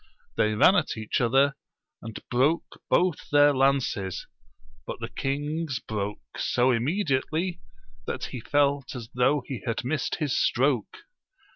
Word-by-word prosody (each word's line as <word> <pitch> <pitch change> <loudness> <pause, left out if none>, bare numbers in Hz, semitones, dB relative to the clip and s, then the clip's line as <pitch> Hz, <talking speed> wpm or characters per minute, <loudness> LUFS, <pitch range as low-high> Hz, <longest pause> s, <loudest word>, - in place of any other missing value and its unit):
They 110 0 +2
ran 180 - +6
at 165 - 0
each 110 +2 -1
other, 135 +4 +3 0.5
and 110 -1 -7
broke 140 +7 +1
both 180 -4 +1
their 145 0 +6
lances; 130 -8 0 0.6
but - - -5
the - - -5
king's 145 +1 -2
broke 105 -2 -5
so 125 +1 +2
immedi 130 - +1
ately, 170 +2 -3 0.5
that - - -3
he 125 - -5
felt 140 +1 +1
as 115 -3 -7
though 135 +3 +2
he 130 -4 -5
had 115 - -1
missed 135 0 -1
his 150 -5 -1
stroke. 130 -4 +1
135 Hz, 140 wpm, -26 LUFS, 120-145 Hz, 0.6 s, ran